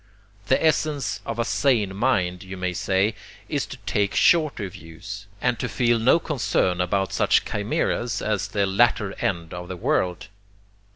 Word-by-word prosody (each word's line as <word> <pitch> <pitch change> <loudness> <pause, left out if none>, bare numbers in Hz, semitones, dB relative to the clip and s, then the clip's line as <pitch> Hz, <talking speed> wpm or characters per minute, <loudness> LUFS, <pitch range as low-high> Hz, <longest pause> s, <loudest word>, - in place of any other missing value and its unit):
The 130 - +3
essence 145 -9 0
of 115 - -3
a 115 - 0
sane 115 -8 +1
mind, 95 -6 +1
you 95 0 -8
may 90 0 -2
say, 95 +4 +1 0.3
is - - -2
to - - -8
take 100 -1 0
shorter 155 -11 +3
views, 95 +3 -9
and 120 -2 0
to 125 - -2
feel 120 +2 +2
no 125 +8 +5
concern 115 - 0
about 95 +2 0
such - - +3
chimaeras 110 +3 -1
as 105 -2 -1
the 100 0 0
latter 100 0 +2
end 85 -3 -2
of 90 0 -6
the 90 - -6
world. 90 +2 -1
100 Hz, 160 wpm, -24 LUFS, 95-120 Hz, 0.3 s, no